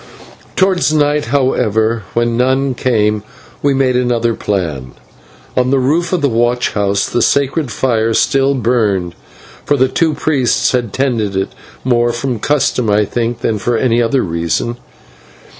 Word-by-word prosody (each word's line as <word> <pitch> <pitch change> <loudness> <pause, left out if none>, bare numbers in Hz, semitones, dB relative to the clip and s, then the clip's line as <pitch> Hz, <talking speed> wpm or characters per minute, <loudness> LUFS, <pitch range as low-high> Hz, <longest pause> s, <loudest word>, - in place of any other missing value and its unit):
Towards 190 -4 +2
night, 150 -2 +1
however, 115 -4 +1
when 120 0 +1
none 130 +2 +1
came, 110 -4 0 0.4
we 140 -1 +2
made 130 -2 +1
another 120 -2 +1
plan. 80 - -3 0.6
On 125 0 +2
the 135 - +2
roof 155 +6 +1
of 180 -3 0
the - - +4
watch 120 0 +1
house 100 -1 0
the 120 - -1
sacred 140 +2 +1
fire 115 -3 0
still 135 0 +2
burned, 105 -8 0 0.5
for 145 - +1
the 130 0 +3
two 160 +4 0
priests 135 -6 +1
had 120 -4 -1
tended 115 -7 -1
it, 95 0 -1 0.3
more 120 -2 +2
from 120 0 -3
custom, 130 -3 0
I 105 0 +3
think, 120 +2 -3
than 110 -3 -1
for 120 +3 0
any 120 -1 +2
other 125 +2 +1
reason. 85 +8 -2
120 Hz, 150 wpm, -15 LUFS, 110-135 Hz, 0.6 s, the